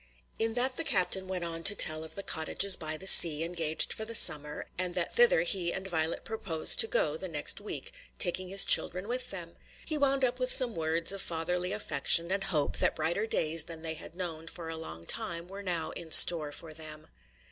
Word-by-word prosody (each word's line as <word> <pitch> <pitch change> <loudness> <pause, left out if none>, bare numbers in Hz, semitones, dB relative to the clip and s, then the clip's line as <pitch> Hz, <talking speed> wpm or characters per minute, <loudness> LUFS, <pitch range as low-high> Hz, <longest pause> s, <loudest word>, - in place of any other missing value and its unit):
In 225 0 -1
that 255 +1 0
the 330 - -2
captain 190 - -1
went 185 -2 -5
on 165 -1 -4
to 200 +4 +5
tell 155 -3 +4
of 160 - -9
the 200 - -3
cottages 185 +5 +2
by 155 0 -3
the 190 - -9
sea 165 -4 +5
engaged 165 -2 0
for 220 - -7
the 230 +1 -7
summer, 150 -6 +3
and 180 -1 -4
that 175 - -3
thither 485 +1 +3
he 175 -4 0
and 190 +1 -7
Violet 160 -2 -3
purposed 185 -8 +1
to 455 - +7
go - - -1
the - - -5
next - - +1
week, - - -9 0.2
taking 185 0 0
his 195 +1 +3
children 180 +3 +4
with 250 +2 -4
them. 170 -3 -9 0.3
He 310 -2 -4
wound 275 -1 +1
up 250 +1 -2
with 255 0 0
some 250 -3 +2
words 165 0 -2
of 195 -1 -4
fatherly 180 +2 -3
affection 170 -3 +1
and 195 0 -2
hope 155 -7 -2
that - - 0
brighter 170 +7 -2
days 160 -5 0
than 165 -1 -10
they 160 -1 -4
had 160 +1 -12
known 165 -3 -7
for 165 0 -8
a 165 - -5
long 85 - -9
time 170 - -2
were 195 +2 -10
now 170 -4 -3
in 170 - -10
store 155 -2 +6
for 155 +2 -10
them. 155 -1 -7
175 Hz, 215 wpm, -28 LUFS, 160-200 Hz, 0.3 s, to